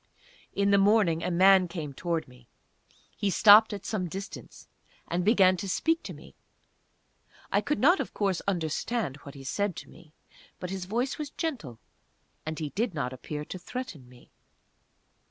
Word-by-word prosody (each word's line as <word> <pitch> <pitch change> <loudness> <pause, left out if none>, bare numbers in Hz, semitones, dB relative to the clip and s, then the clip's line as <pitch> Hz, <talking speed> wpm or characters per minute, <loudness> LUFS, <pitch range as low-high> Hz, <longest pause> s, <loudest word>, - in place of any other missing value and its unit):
In 200 0 +2
the 200 - +5
morning 195 -5 +3
a 180 - -1
man 185 +1 +5
came 160 -5 -6
towards 165 +2 -2
me. 125 -2 -18 0.7
He 205 - -1
stopped 215 +3 +7
at 200 -2 -6
some 190 -5 -2
distance, 195 +4 -9 0.4
and 175 +1 -1
began 190 -3 +4
to 195 +1 -5
speak 325 - +1
to - - -8
me. - - -14 1.2
I - - +3
could 295 - -1
not, 350 +8 +4
of - - -3
course, 195 -4 -1
understand 175 - -2
what 140 -1 -12
he 135 - -10
said 200 +7 -2
to - - -9
me, 165 -3 -17 0.5
but 180 0 -5
his 190 -2 -4
voice 240 +9 -2
was 300 -2 -4
gentle, 250 - -5 0.7
and 155 0 -3
he 155 -3 -3
did 210 +2 -2
not 130 -3 -2
appear 150 +3 -6
to 185 - -7
threaten 180 - -7
me. 125 -1 -19
185 Hz, 170 wpm, -28 LUFS, 155-210 Hz, 1.2 s, stopped